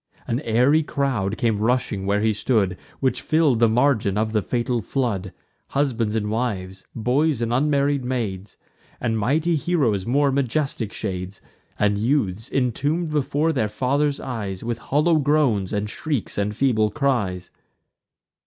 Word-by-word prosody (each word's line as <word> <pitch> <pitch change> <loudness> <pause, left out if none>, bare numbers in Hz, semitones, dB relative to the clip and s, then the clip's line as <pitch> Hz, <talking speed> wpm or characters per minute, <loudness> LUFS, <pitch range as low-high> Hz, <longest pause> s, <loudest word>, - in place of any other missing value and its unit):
An 120 - -1
airy 130 +4 +3
crowd 130 -9 -1
came 110 -3 +1
rushing 110 -4 0
where 100 +1 +2
he 110 0 +2
stood, 105 -3 +1 0.3
Which 130 -1 +1
fill'd 155 -7 +2
the 115 -1 +5
margin 110 -4 +2
of 110 +1 0
the 110 -1 +1
fatal 120 +2 -1
flood: 105 -7 -2 0.4
Husbands 120 -6 0
and 105 -1 -1
wives, 95 -5 -3
boys 130 +5 +1
and 115 0 -1
unmarried 140 0 +2
maids, 105 -6 -3 0.4
And 115 -2 -1
mighty 150 +10 +1
heroes' 135 - 0
more 140 +3 +3
majestic 135 -4 -1
shades, 95 -2 -5 0.4
And 105 -1 +1
youths, 110 -3 0
intomb'd 145 +6 0
before 150 +2 +1
their 110 -7 0
fathers' 140 +5 0
eyes, 100 -7 -5
With 115 0 -3
hollow 150 +6 +2
groans, 140 -10 +2
and 105 0 -1
shrieks, 140 +2 -3
and 105 +1 -1
feeble 110 -4 +2
cries. 105 -11 -1
120 Hz, 145 wpm, -23 LUFS, 105-140 Hz, 0.4 s, the